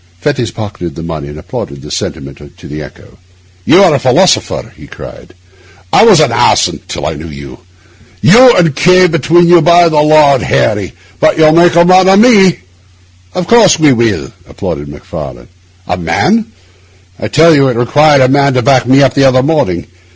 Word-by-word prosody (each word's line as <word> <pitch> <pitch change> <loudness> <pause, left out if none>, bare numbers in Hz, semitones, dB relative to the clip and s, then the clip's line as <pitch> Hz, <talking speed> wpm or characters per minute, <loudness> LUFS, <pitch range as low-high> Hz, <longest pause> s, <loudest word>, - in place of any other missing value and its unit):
Fettes 120 +2 -3
pocketed 105 -6 -8
the 80 - -9
money, 80 -3 -7
and 75 +1 -11
applauded 70 -2 -9
the - - -11
sentiment 70 +1 -8
to - - -14
the 75 +1 -8
echo. 75 - -15 0.5
'You - - +4
are - - +3
a - - 0
philosopher,' - - -1
he - - -15
cried. - - -13 0.6
'I - - +4
was 210 -7 +4
an 150 -6 +1
ass 115 - +1 0.2
till - - -7
I - - -3
knew 80 +3 -10
you. 70 -3 -12 0.6
You 240 - +4
and 165 -6 0
K— 180 +3 +3
between 170 +1 +1
you, 175 -1 +4
by 170 +1 +3
the 150 -2 +1
Lord 150 -3 +3
Harry! 105 -3 -2 0.3
but - - +1
you'll 155 -1 +3
make 170 +1 +2
a 170 0 +4
man 185 +1 +3
of 195 - +4
me.' 200 - +3 0.7
'Of 180 - -3
course 220 -4 +3
we 155 -2 +2 0.2
shall,' 100 - -6 0.2
applauded 70 +1 -7
Macfarlane. 70 -4 -10 0.4
'A 90 - -4
man? 185 - -2 0.7
I - - -5
tell 165 +2 +3
you, 140 -2 +2
it 125 -3 -3
required 145 +4 +2
a 130 - +3
man 140 0 0
to 125 - -1
back 130 -1 +1
me 135 +2 +3
up 135 - +1
the 140 - +1
other 130 -1 +2
morning. 135 - -2
140 Hz, 190 wpm, -10 LUFS, -, 0.7 s, You